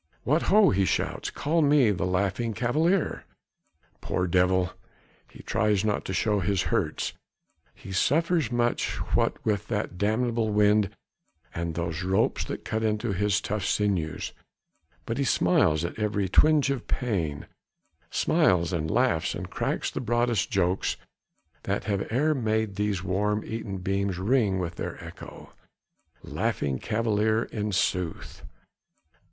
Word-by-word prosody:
"What 150 Hz, +6 st, +2 dB
ho!" 210 Hz, 0 st, +6 dB
he 95 Hz, 0 st, +2 dB
shouts, 95 Hz, -, -1 dB
"call 160 Hz, +3 st, 0 dB
me 140 Hz, -6 st, +4 dB
the 95 Hz, -1 st, -1 dB
Laughing 100 Hz, +5 st, -1 dB
Cavalier!" 155 Hz, -, +1 dB, 0.8 s
Poor 90 Hz, -, -1 dB
devil! 90 Hz, 0 st, +2 dB, 0.6 s
he -, -, -14 dB
tries 105 Hz, -2 st, +1 dB
not 105 Hz, -1 st, 0 dB
to -, -, -4 dB
show 105 Hz, +3 st, +1 dB
his 95 Hz, 0 st, 0 dB
hurts. -, -, -1 dB, 0.6 s
He -, -, -11 dB
suffers 155 Hz, -, +1 dB
much 120 Hz, 0 st, 0 dB, 0.2 s
what -, -, +1 dB
with 105 Hz, -1 st, 0 dB
that 105 Hz, -5 st, -3 dB
damnable 110 Hz, +2 st, +1 dB
wind 105 Hz, -1 st, +3 dB, 0.6 s
and 85 Hz, -1 st, -3 dB
those 85 Hz, 0 st, -3 dB
ropes 95 Hz, +1 st, +1 dB
that -, -, -6 dB
cut 110 Hz, 0 st, -2 dB
into 110 Hz, 0 st, 0 dB
his 100 Hz, +2 st, +1 dB
tough 105 Hz, -1 st, -3 dB
sinews, 95 Hz, -7 st, -1 dB, 0.7 s
but 115 Hz, +3 st, -3 dB
he -, -, +2 dB
smiles 85 Hz, -, +2 dB
at 85 Hz, -, -6 dB
every 105 Hz, -2 st, 0 dB
twinge 150 Hz, +7 st, +4 dB
of 135 Hz, -4 st, -4 dB
pain: 85 Hz, -, -2 dB, 0.6 s
smiles 90 Hz, -1 st, +2 dB
and 80 Hz, -2 st, -1 dB
laughs 120 Hz, -7 st, +1 dB
and -, -, -6 dB
cracks -, -, -2 dB
the -, -, -4 dB
broadest 120 Hz, -2 st, +1 dB
jokes 95 Hz, -3 st, 0 dB, 0.6 s
that -, -, -2 dB
have 100 Hz, -1 st, -2 dB
e'er 150 Hz, +7 st, +2 dB
made 110 Hz, -5 st, 0 dB
these 100 Hz, -3 st, -1 dB
worm 105 Hz, +3 st, 0 dB
eaten 110 Hz, -3 st, -5 dB
beams 95 Hz, 0 st, -1 dB
ring 105 Hz, 0 st, +2 dB
with 85 Hz, -2 st, -4 dB
their -, -, -4 dB
echo. -, -, -11 dB, 0.7 s
The -, -, -10 dB
Laughing 65 Hz, -3 st, -1 dB
Cavalier 110 Hz, 0 st, +1 dB
in 105 Hz, -1 st, -4 dB
sooth! 90 Hz, -3 st, -2 dB
105 Hz, 140 wpm, -27 LUFS, 95-115 Hz, 0.8 s, ho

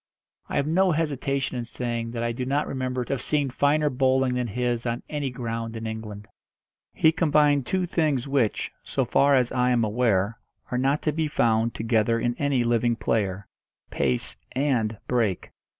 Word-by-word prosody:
I -, -, -4 dB
have 140 Hz, -, +2 dB
no 180 Hz, +4 st, +3 dB
hesitation 140 Hz, -4 st, -1 dB
in -, -, -3 dB
saying 120 Hz, -1 st, -4 dB
that 115 Hz, -1 st, -2 dB
I 120 Hz, -, 0 dB
do 125 Hz, +2 st, -4 dB
not 140 Hz, +3 st, 0 dB
remember 130 Hz, -2 st, -3 dB
to -, -, -2 dB
have 130 Hz, -, -3 dB
seen 145 Hz, -2 st, 0 dB
finer 150 Hz, +3 st, +2 dB
bowling 130 Hz, 0 st, +2 dB
than 125 Hz, -1 st, -1 dB
his 120 Hz, +2 st, -1 dB
on 120 Hz, +1 st, -2 dB
any 145 Hz, -3 st, -2 dB
ground 115 Hz, -2 st, -4 dB
in 115 Hz, 0 st, -5 dB
England. 110 Hz, -2 st, -6 dB, 0.6 s
He 160 Hz, -, +4 dB
combined 150 Hz, -4 st, +3 dB
two 185 Hz, -1 st, 0 dB
things 150 Hz, -7 st, 0 dB
which, 135 Hz, -6 st, 0 dB
so -, -, -1 dB
far 140 Hz, 0 st, +4 dB
as 125 Hz, -2 st, +2 dB
I 125 Hz, 0 st, +2 dB
am 120 Hz, -2 st, +2 dB
aware, 110 Hz, -2 st, +1 dB, 0.3 s
are 125 Hz, -, 0 dB
not 135 Hz, +3 st, +1 dB
to 155 Hz, -, +1 dB
be 160 Hz, +1 st, -1 dB
found 115 Hz, -4 st, +1 dB
together 115 Hz, 0 st, +1 dB
in 120 Hz, +1 st, 0 dB
any 140 Hz, -4 st, +1 dB
living 120 Hz, 0 st, +2 dB
player 100 Hz, -3 st, -1 dB, 0.5 s
pace 65 Hz, -2 st, -1 dB, 0.2 s
and 125 Hz, -6 st, 0 dB
break. 115 Hz, -7 st, 0 dB
125 Hz, 180 wpm, -25 LUFS, 115-140 Hz, 0.6 s, He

